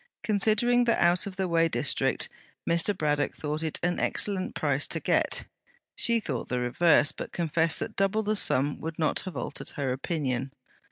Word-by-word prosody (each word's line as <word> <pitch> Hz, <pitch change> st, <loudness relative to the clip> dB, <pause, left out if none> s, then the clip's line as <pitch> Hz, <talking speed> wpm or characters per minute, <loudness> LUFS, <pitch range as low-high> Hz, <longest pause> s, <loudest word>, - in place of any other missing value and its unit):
Considering 220 Hz, +4 st, +3 dB
the 235 Hz, -, +2 dB
out 175 Hz, +2 st, +3 dB
of 195 Hz, -, -6 dB
the 190 Hz, -1 st, -1 dB
way 165 Hz, -1 st, +3 dB
district, -, -, 0 dB, 0.4 s
Mr. 170 Hz, +4 st, +2 dB
Braddock 145 Hz, -2 st, 0 dB
thought 150 Hz, +1 st, -3 dB
it 160 Hz, -2 st, -1 dB
an 175 Hz, 0 st, 0 dB
excellent 195 Hz, -2 st, 0 dB
price -, -, 0 dB
to -, -, -2 dB
get. -, -, +1 dB, 0.5 s
She 235 Hz, -1 st, +3 dB
thought 135 Hz, -, -5 dB
the 125 Hz, -, -1 dB
reverse, 145 Hz, +5 st, +3 dB
but -, -, -8 dB
confessed 165 Hz, -1 st, 0 dB
that -, -, -5 dB
double 195 Hz, +2 st, +1 dB
the 215 Hz, +1 st, 0 dB
sum 145 Hz, -7 st, +2 dB
would 160 Hz, 0 st, -6 dB
not 155 Hz, -, 0 dB
have 185 Hz, -, -7 dB
altered -, -, -5 dB
her 140 Hz, -4 st, -1 dB
opinion. 135 Hz, -2 st, -3 dB
170 Hz, 175 wpm, -27 LUFS, 150-195 Hz, 0.5 s, Considering